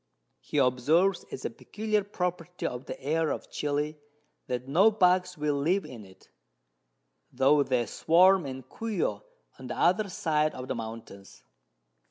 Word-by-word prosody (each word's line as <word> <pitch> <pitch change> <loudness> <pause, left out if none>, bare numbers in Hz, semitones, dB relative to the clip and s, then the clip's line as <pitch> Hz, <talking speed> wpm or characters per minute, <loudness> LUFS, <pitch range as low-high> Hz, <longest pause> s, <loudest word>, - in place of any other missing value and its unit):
He - - -5
observes 155 +10 +2
as 130 - -6
a - - -2
peculiar 210 - -2
Property 180 -3 -4
of 125 +1 -4
the - - -7
Air 155 +3 0
of - - -5
Chili, 150 +1 -2 0.5
that 125 0 -3
no 180 +10 +5
Bugs 180 -3 +2
will 150 0 0
live 160 +6 +1
in 120 -8 -10
it, 95 - -20 1.0
tho' 135 +3 +4
they 125 -4 +1
swarm 175 - +4
in 130 0 -7
Cuio 210 - -3 0.4
on - - -8
the - - -5
other 200 +4 +2
side 155 -3 0
of 130 0 -7
the - - -2
Mountains. 110 -4 -9
155 Hz, 150 wpm, -28 LUFS, 130-180 Hz, 1.0 s, no